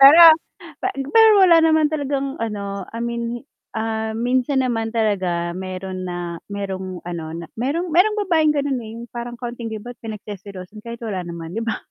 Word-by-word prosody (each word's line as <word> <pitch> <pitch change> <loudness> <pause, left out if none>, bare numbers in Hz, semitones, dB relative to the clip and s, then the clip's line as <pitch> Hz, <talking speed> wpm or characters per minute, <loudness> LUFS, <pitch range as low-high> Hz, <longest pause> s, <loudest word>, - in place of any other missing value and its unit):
Pero, 285 +5 +10 0.6
pe - - 0 0.3
pero 445 0 +9
wala 345 -3 +7
naman 315 -1 +5
talagang 275 -2 -1
ano, 200 -3 -3
I 230 - -6
mean, 235 0 -3 0.3
ah, 220 0 -2
minsan 255 +3 +1
naman 225 -2 -1
talaga 185 -6 0
meron 185 0 -5
na, 175 -1 -4
merong 190 -2 -4
ano 170 -2 -4
na 170 0 -6
merong 305 +9 -1
merong 420 +5 +4
babaeng 315 -4 +4
ganun, 280 -3 0
eh 220 - -8
yung 235 - -8
parang 240 0 -5
konting 240 -2 -5
kibot 225 +3 -7
pinagseselosan, 205 -2 -8
kahit 235 0 -7
wala 200 -5 -3
naman 170 -1 -7
'di 225 - -2
ba? 225 - -1
225 Hz, 165 wpm, -21 LUFS, 190-260 Hz, 0.6 s, Pero